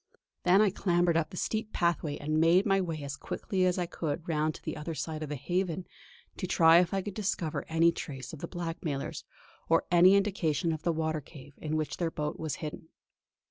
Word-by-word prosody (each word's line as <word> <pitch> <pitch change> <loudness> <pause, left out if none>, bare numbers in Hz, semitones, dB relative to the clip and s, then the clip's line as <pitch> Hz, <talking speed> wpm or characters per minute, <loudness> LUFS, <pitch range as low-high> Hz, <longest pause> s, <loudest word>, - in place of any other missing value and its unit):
Then 185 +3 +6
I 205 - +3
clambered 175 -3 +2
up 165 -1 +1
the 180 - -9
steep 220 +2 -2
pathway 170 -4 0
and 155 +2 -1
made 170 +4 +5
my 195 -2 +3
way 165 -5 -3
as 140 0 -4
quickly 185 -2 -1
as 180 - +1
I 180 - 0
could 160 -1 -4
round 155 -1 0
to - - -12
the - - -4
other 155 +1 -5
side 155 0 -4
of 155 - -4
the 150 - -2
Haven, 180 +5 -2 0.5
to 185 - -3
try 165 -2 +6
if 175 -2 +1
I 195 -1 -1
could 205 - -5
discover 185 -6 -2
any 165 +1 +4
trace 135 -5 -7
of 160 - -8
the - - -5
blackmailers, 165 -5 -4 0.4
or 165 0 +3
any 180 +2 +7
indication 175 -6 +1
of 155 - -5
the 170 - +1
water 160 -1 -1
cave 145 0 -13
in 155 0 -3
which 155 -1 -2
their 170 -2 0
boat 150 -2 -4
was 160 -2 -2
hidden. 150 +1 -7
165 Hz, 215 wpm, -30 LUFS, 155-180 Hz, 0.5 s, any